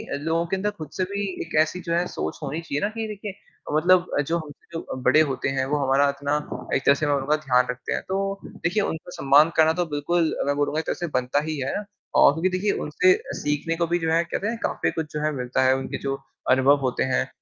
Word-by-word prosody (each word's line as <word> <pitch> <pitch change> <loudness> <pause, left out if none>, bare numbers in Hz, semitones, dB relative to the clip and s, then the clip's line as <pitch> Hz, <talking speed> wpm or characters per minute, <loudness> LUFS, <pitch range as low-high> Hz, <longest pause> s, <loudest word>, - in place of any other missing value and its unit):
कि 145 - -6
लोगों 165 +1 +1
के 190 - 0
अंदर 195 +2 -1
खुद 155 -3 -7
से 185 - +1
भी 200 0 -2 0.2
एक - - -7
ऐसी 155 +3 -1
जो 170 - 0
है 175 +1 +2
सोच 80 - -4
होनी 150 +3 -3
चाहिए 145 -3 -3
ना 205 - +1
कि 225 0 -4
देखिए, 205 -1 -6 0.4
मतलब 175 +3 +4 0.2
जो 170 - +1
हमसे 155 -3 -10
जो 130 - -6
बड़े 155 +5 +6
होते 135 - -2
हैं 130 - +1
वो - - +3
हमारा 140 +2 +4
इतना 140 +1 -1 0.4
एक - - -1
तरह 140 - +6
से 155 - -1
मैं 145 - +3
बोलूँगा 140 +2 +1
ध्यान 125 -1 +4
रखते 125 0 -5
हैं, - - -1
तो 195 +1 -1
देखिए 190 +5 -1
उनका 160 0 -4
सम्मान 145 +3 +5
करना 160 0 +5
तो - - +1
बिल्कुल 165 +3 +1
मैं 145 - +2
बोलूँगा 145 +2 0
एक - - -4
तरह - - -1
से 175 - -3
बनता 125 +3 0
ही 155 - -2
है। 130 - -2 0.4
और - - +7
क्योंकि 165 +5 0
देखिए, 185 +3 0
उनसे 180 +5 +3 0.3
सीखने 150 +3 -1
को 170 - +1
भी 175 - +1
जो 165 -1 -1
है 165 +1 +3
कहते 185 +4 -3
हैं 230 +1 -2
काफ़ी - - 0
कुछ 160 -2 -5
जो 150 - -2
है 155 - +1
मिलता 125 0 0
है 130 0 +5
उनके 135 - -4
जो 135 - 0 0.4
अनुभव 130 +2 +5
होते 125 - 0
हैं - - +1
155 Hz, 250 wpm, -24 LUFS, 140-175 Hz, 0.4 s, और